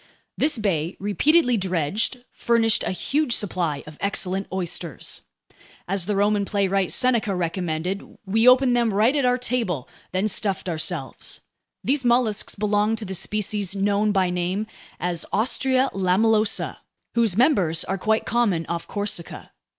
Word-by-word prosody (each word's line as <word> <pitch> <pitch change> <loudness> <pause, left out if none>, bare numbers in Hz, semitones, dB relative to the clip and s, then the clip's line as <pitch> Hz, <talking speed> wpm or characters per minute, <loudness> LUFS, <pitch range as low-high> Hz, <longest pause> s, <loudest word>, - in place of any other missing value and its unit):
This 300 -3 +1
bay, 175 -5 -1
repeatedly 250 - +3
dredged, 190 - -1
furnished 230 -2 +2
a - - -1
huge 275 +7 0
supply 170 -9 -1
of 150 -1 -12
excellent 195 -1 0
oysters. 175 -3 -3 0.7
As 190 -1 0
the 210 - 0
Roman 205 +1 +2
playwright 195 -2 0
Seneca 235 -6 +2
recommended, 175 +1 -3
we 225 +5 +2
opened 250 0 +6
them 235 -2 +2
right 225 +7 +3
at 280 -3 +2
our 250 0 +3
table, 225 - -2 0.2
then 185 +3 0
stuffed 200 -3 -1
ourselves. 165 -3 -4 0.4
These 275 0 +1
mollusks 240 -3 +1
belonged 210 +1 +1
to 220 - -4
the 190 - -5
species 205 0 -2
known 205 +1 +1
by 190 -3 +2
name 180 +4 -1 0.3
as 175 -1 -2
Ostrea 260 +4 +1
lamellosa, 210 +3 +2 0.4
whose 225 -5 +2
members 195 - +3
are 195 0 -3
quite 220 +3 +1
common 215 -8 +1
off 170 +1 -4
Corsica. 205 -4 -4
205 Hz, 140 wpm, -23 LUFS, 185-230 Hz, 0.7 s, opened